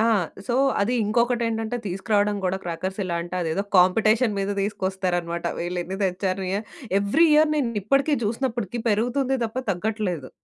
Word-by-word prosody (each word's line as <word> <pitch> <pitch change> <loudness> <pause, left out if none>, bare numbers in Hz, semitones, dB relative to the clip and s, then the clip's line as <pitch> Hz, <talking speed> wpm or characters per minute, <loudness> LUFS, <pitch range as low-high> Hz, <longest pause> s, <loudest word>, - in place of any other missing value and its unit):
ఆ! - - +4 0.4
సో, 240 - 0 0.3
అది 215 +5 +1
ఇంకొకటేంటంటే, 230 0 0
తీసుకురాడం 205 +2 +1
గుడా 185 +1 0
క్రాకర్సెలా 185 +1 -3
అంటే, 175 +1 -7
అదేదో 165 +4 -1
కాంపిటేషన్ 215 +5 +4
మీద 195 0 -1
దీసుకొస్తారనమాట. 185 -4 -2
వీళ్ళేన్ని 180 +2 -3
తెచ్చారు, 190 +1 -1
యాహ్, 205 +3 -2 0.4
ఎవ్రి 265 +12 +4
ఇయర్ 305 0 +5
నేనిప్పడికీ, 275 +3 +1
జూసినప్పడికీ 235 -1 -2
పెరుగుతుంది 245 +5 +1
తప్ప 225 +3 -4
తగ్గట్లేదు. 185 - -2
205 Hz, 125 wpm, -24 LUFS, 185-235 Hz, 0.4 s, ఇయర్